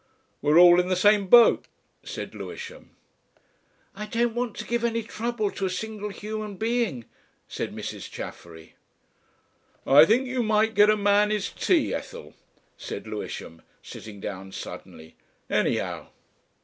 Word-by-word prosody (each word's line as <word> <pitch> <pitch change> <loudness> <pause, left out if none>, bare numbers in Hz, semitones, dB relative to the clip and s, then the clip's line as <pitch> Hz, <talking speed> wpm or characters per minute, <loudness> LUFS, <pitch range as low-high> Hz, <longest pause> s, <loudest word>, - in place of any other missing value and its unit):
"We're 150 +2 +3
all 175 0 +8
in 180 - +1
the 185 - +2
same 205 +1 +3
boat," 235 +4 +6 0.4
said - - -7
Lewisham. 475 +1 -9 1.1
"I 210 +1 -6
don't 235 +1 0
want 240 -2 -3
to - - -5
give 235 0 -2
any 230 -1 0
trouble 220 -1 -3
to 195 - -2
a - - -2
single 210 +2 -5
human 210 0 -6
being," 220 - -1 0.4
said - - -5
Mrs. - - -7
Chaffery. 80 -1 -10 1.1
"I 145 +3 +8
think 240 +8 +2
you 255 -1 -2
might 220 0 +2
get 210 0 +5
a 215 - +4
man 205 0 +3
his 210 -2 -2
tea, - - +1
Ethel," - - -7 0.4
said - - -7
Lewisham, 80 0 -7 0.2
sitting 105 -2 -10
down 95 -1 -7
suddenly; 80 0 -10 0.3
"anyhow." - - -1
210 Hz, 140 wpm, -25 LUFS, 180-230 Hz, 1.1 s, all